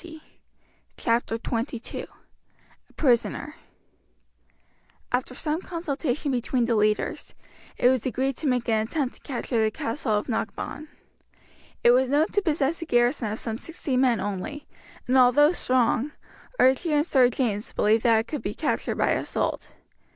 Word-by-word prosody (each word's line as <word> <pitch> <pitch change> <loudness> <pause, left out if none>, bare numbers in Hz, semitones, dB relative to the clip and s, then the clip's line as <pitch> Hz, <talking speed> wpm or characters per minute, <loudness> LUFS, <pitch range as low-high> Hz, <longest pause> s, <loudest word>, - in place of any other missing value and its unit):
Chapter 230 -1 0
XXII 235 +1 -4 0.8
A - - -24
Prisoner 275 +2 +1 1.6
After 250 0 -1
some 310 +4 -2
consultation 300 -5 -2
between 245 0 0
the 230 - +1
leaders, 210 0 0 0.4
it - - +4
was 255 -3 +3
agreed 265 +2 -1
to 305 - -1
make 250 -2 0
an 220 -1 +1
attempt 270 0 -2
to - - -18
capture 240 -4 -2
the 220 - +3
castle 230 +2 -2
of 210 0 0
Knockbawn. 245 +6 -4 1.0
It 240 - +7
was 255 +1 +3
known 295 +4 +3
to 410 - +1
possess 315 -2 0
a - - -3
garrison 240 -4 +1
of 215 - -3
some 225 -1 -4
sixty 315 -5 -4
men 250 -3 +3
only, 205 +10 -4 0.4
and 260 +1 +3
although 255 +5 +6
strong, 255 -2 +1 0.4
Archie 265 +5 +3
and 295 0 +3
Sir 260 -7 +4
James 225 -4 -2
believed 215 +2 +2
that 225 -2 +4
it 225 - -11
could 300 - -4
be - - -4
captured - - -1
by - - +1
assault. - - -2
250 Hz, 150 wpm, -25 LUFS, 230-290 Hz, 1.6 s, It